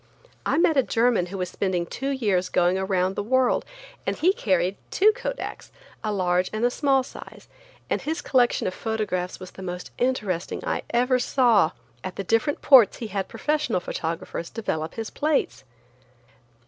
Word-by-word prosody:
I - - +2
met 320 -2 +3
a - - +7
German 230 -6 +2
who 195 +2 -6
was 180 -1 -3
spending 185 -3 -1
two 270 +10 -4
years 205 -9 0
going 175 +1 +2
around 190 -1 0
the - - -1
world 255 +4 +2 0.4
and - - 0
he 365 +4 +3
carried 185 - +1
two 420 +3 +5
Kodaks, - - -6 0.3
a 215 - -1
large 180 -2 +1
and 215 +2 0
a 245 - +2
small 270 -1 +2
size, - - -12 0.4
and - - -1
his 320 +2 -2
collection 245 -2 +2
of 185 - -1
photographs 205 -5 -3
was 185 -1 -9
the - - -11
most 180 -1 -6
interesting 215 -9 -1
I - - -1
ever 250 +1 +2
saw. 240 - +3 0.3
At 185 - -5
the 195 - -4
different 225 +8 0
ports 255 -7 +7
he 225 - -6
had 195 -2 -1
professional 295 -2 -1
photographers 165 0 -4
develop 160 -8 -3
his 225 -1 -5
plates. 300 -1 0
215 Hz, 170 wpm, -25 LUFS, 185-255 Hz, 0.4 s, a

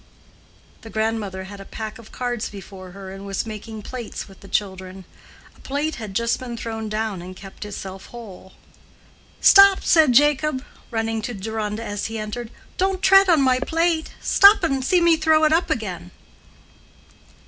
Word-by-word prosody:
The 225 - -11
grandmother 220 -4 -2
had 200 +1 -10
a - - -8
pack 220 +2 -7
of 225 - -14
cards 245 -3 -3
before 190 -2 -10
her 195 -1 -9
and 195 +1 -9
was 200 +1 -3
making 220 0 -8
"plates" 245 -1 -7
with 195 - -16
the 195 - -14
children. 190 -2 -3 0.5
A - - -23
plate 290 +3 -3
had 215 -5 -7
just 235 +1 +1
been 240 -2 -6
thrown 225 -1 -5
down 215 -3 -3
and 185 +1 -9
kept 195 +2 -10
itself 195 -2 -8
whole. 200 -6 -11 0.9
"Stop!" 395 -1 +7
said 315 -6 +5
Jacob, 290 0 +3 0.2
running 225 -1 -2
to 240 +2 -5
Deronda 215 +2 -4
as 205 -2 -4
he 225 0 -5
entered. 220 +2 -5 0.3
"Don't 380 0 0
tread 390 0 +6
on 320 -5 +5
my 255 -1 +3
plate. 325 +3 0
Stop 400 0 +6
and 270 -5 0
see 355 +6 +3
me 340 -1 +5
throw 315 0 +3
it 310 0 +4
up 335 +2 +2
again." 190 - -3
225 Hz, 170 wpm, -22 LUFS, 200-290 Hz, 0.9 s, Stop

